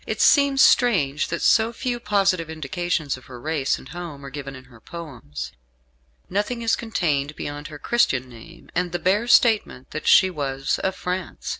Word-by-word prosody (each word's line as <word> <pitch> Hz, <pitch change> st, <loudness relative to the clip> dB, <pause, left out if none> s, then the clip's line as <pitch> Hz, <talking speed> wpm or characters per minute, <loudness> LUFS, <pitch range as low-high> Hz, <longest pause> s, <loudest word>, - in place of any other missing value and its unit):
It -, -, -3 dB
seems 280 Hz, -2 st, +5 dB
strange 155 Hz, -, +3 dB
that 170 Hz, -, -3 dB
so 225 Hz, 0 st, +4 dB
few 240 Hz, 0 st, -3 dB
positive 195 Hz, -6 st, +1 dB
indications 160 Hz, -1 st, -2 dB
of 130 Hz, -, -16 dB
her 125 Hz, -2 st, -10 dB
race 145 Hz, 0 st, -1 dB
and -, -, -13 dB
home 160 Hz, -4 st, -8 dB
are 135 Hz, -, -8 dB
given 135 Hz, -1 st, -7 dB
in 130 Hz, -, -11 dB
her 120 Hz, -4 st, -18 dB
poems 135 Hz, -, -8 dB, 0.8 s
nothing 210 Hz, +5 st, -2 dB
is 225 Hz, -, +2 dB
contained 150 Hz, -10 st, -1 dB
beyond 145 Hz, 0 st, -6 dB
her 150 Hz, -, -9 dB
Christian 135 Hz, -, +1 dB
name 125 Hz, +8 st, -14 dB
and 175 Hz, 0 st, -1 dB
the -, -, +1 dB
bare 195 Hz, +6 st, +1 dB
statement 220 Hz, -, +3 dB
that 155 Hz, -, -5 dB
she 190 Hz, -1 st, +6 dB
was 135 Hz, -4 st, -2 dB
of 190 Hz, 0 st, -1 dB
France. 180 Hz, 0 st, -4 dB
165 Hz, 175 wpm, -23 LUFS, 140-200 Hz, 0.8 s, she